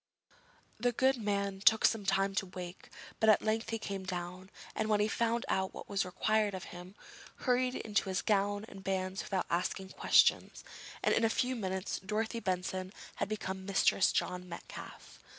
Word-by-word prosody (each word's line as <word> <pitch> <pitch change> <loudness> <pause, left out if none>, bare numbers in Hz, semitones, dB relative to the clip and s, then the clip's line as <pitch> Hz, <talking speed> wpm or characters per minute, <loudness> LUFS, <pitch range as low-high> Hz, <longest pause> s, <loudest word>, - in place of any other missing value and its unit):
The 245 +2 +2
good 260 +2 +3
man 200 -3 -1
took 220 +3 +5
some 205 -4 +2
time 195 0 +2
to 195 -1 -1
wake, 180 0 -8 0.3
but 220 - +4
at 215 - +5
length 220 +1 0
he 225 - -1
came 200 -3 -5
down, 180 0 -5 0.2
and, 220 0 -1
when 210 -1 +3
he 210 - +3
found 230 +2 0
out 190 0 0
what - - -8
was 200 -1 0
required 210 +2 +1
of 185 - -6
him, 180 +2 -10 0.5
hurried 250 0 +2
into 205 -3 -1
his 185 - -1
gown 205 0 +1
and 195 -3 -11
bands 190 0 -1
without 190 -2 -2
asking 185 +2 -1
questions, - - +3 0.4
and - - +3
in 230 - +2
a 225 - +4
few 255 +3 0
minutes 190 -4 -3
Dorothy 220 +4 -2
Benson 185 -1 -2 0.3
had - - -1
become 190 -3 -4
Mistress 195 0 +3
John 180 0 -2
Metcalfe. - - -9
195 Hz, 175 wpm, -33 LUFS, 190-220 Hz, 0.5 s, took